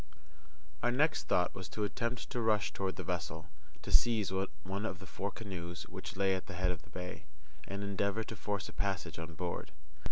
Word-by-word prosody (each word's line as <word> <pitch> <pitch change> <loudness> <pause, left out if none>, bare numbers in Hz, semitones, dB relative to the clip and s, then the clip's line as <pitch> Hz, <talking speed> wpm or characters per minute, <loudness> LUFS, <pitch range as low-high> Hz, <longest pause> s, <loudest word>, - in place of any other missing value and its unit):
Our 120 - +4
next 145 +6 +3
thought 90 -1 +4
was 95 - -5
to 105 - -1
attempt 115 +3 -1
to 120 - +1
rush 110 -3 +3
toward 95 -1 0
the - - -3
vessel, 85 -1 -2 0.3
to - - -4
seize 110 -5 +5 0.3
one 95 +3 -2
of 95 -5 -1
the 95 - -9
four 95 +3 -2
canoes 90 -6 -4
which - - -6
lay 95 -1 +5
at 95 - -2
the 100 - -5
head 90 0 +3
of 90 -4 -4
the - - -17
bay, 90 -3 -5 0.4
and 100 +1 -2
endeavour 100 +2 +1
to 110 - -6
force 100 -3 -1
a - - -9
passage 90 -5 0
on 80 0 -5
board. 85 0 -2
95 Hz, 200 wpm, -35 LUFS, 90-105 Hz, 0.4 s, seize